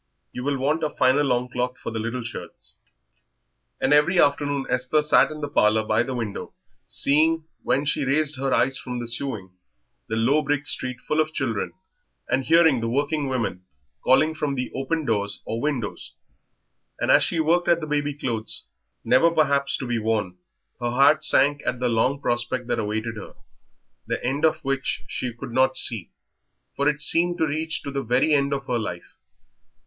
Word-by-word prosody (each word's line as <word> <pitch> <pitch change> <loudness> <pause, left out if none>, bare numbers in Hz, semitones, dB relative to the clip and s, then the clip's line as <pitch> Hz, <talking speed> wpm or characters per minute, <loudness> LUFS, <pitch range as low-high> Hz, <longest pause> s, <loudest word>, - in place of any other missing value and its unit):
You 125 - -6
will 140 0 0
want 150 +5 0
a 155 - +1
finer 135 +2 +2
longcloth 125 -1 -1
for - - -6
the 110 - -3
little 115 +3 -3
shirts." 120 - -8 1.0
And 135 - +2
every 150 +5 +4
afternoon 145 -2 +2
Esther 130 +4 +1
sat 150 - +4
in 155 0 -8
the 145 - -2
parlour 110 -5 +3
by 110 0 +2
the 130 +1 -3
window, 110 -4 -5 0.3
seeing, 160 +3 +2 0.2
when 140 +2 0
she 150 0 0
raised 145 +2 +1
her 135 0 -1
eyes 135 0 +2
from 125 -1 -5
the 120 -1 -4
sewing, 115 -6 -3 0.6
the 110 - -2
low 130 +7 +3
brick 145 0 -1
street 130 -3 0
full 155 +1 +1
of 155 0 -3
children, 115 -7 -2 0.5
and 135 - 0
hearing 160 -4 +4
the 115 - -1
working 145 +3 0
women 115 -8 -2 0.4
calling 155 +5 +4
from 150 -3 -2
the 125 -1 -3
open 145 +4 -2
doors 100 -4 -1
or 115 +1 -3
windows; 130 -8 -3 0.9
and - - +2
as - - +6
she 165 - 0
worked 170 +3 +2
at 170 -1 +4
the 155 - -5
baby 145 -1 -1
clothes, 115 -6 -2 0.4
never 165 +6 +4
perhaps 140 -4 +1
to 135 - -5
be 120 -2 -1
worn, 105 -5 -1 0.4
her 120 - -1
heart 140 +5 +4
sank 145 +1 +3
at 125 - -2
the 125 - 0
long 125 +5 +1
prospect 120 0 -1
that - - -1
awaited 110 +1 -3
her, 105 - -10 0.7
the - - -3
end 140 +5 +1
of 160 - +3
which 135 -8 -1
she 125 +4 -3
could 120 +1 -9
not 130 +2 +2
see, 110 -7 -1 0.7
for 140 +1 +2
it 150 0 -2
seemed 175 +3 +2
to 160 - +2
reach 160 +2 -2
to 140 - -5
the 140 0 -2
very 130 +6 +2
end 140 -1 +2
of 135 -1 -2
her 125 -2 -1
life. 90 -5 -7
135 Hz, 185 wpm, -24 LUFS, 120-150 Hz, 1.0 s, as